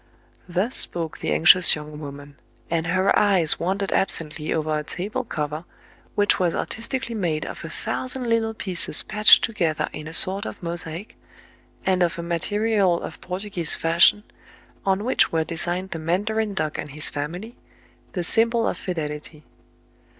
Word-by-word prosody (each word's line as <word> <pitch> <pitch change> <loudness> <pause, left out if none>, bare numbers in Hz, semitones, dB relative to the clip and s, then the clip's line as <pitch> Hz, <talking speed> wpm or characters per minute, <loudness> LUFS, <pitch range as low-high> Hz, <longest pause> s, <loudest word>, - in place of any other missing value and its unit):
*' - - -36
Thus 190 +8 0
spoke 165 -2 +2
the - - -3
anxious 80 - +7
young 150 0 -9
woman; 145 -1 -10 0.3
and 165 -1 -1
her 185 +2 +2
eyes 190 -6 +4
wandered 195 +3 -2
absently 155 -4 -2
over 155 -1 -1
a - - -5
table 190 +10 -4
cover, 150 - -4 0.5
which 205 0 +2
was 175 -2 +1
artistically 235 +2 -4
made 170 -8 -2
of - - -8
a - - -6
thousand 255 -1 -3
little 225 -1 0
pieces 180 -7 +3
patched 215 0 +6
together 170 -9 -1
in 155 0 -7
a - - -7
sort 195 +5 +3
of - - -9
mosaic, 170 +3 -3 0.7
and 185 -1 +1
of 175 0 +1
a 170 - -5
ma 170 0 -1
terial 205 -2 +1
of 160 - -9
Portuguese 180 -2 -4
fashion, 170 +5 +4 0.6
on 195 +1 +1
which 255 - +2
were 160 -1 +1
de 165 - -6
signed 180 +3 -2
the 165 - -4
mandarin 205 +6 -1
duck 155 -5 -2
and 150 - -5
his 150 +1 +2
family, 175 - -6 0.6
the 180 - -2
sym 225 +6 +2
bol 230 -1 0
of - - -2
fidelity. 150 -3 -6
175 Hz, 165 wpm, -23 LUFS, 160-205 Hz, 0.7 s, anxious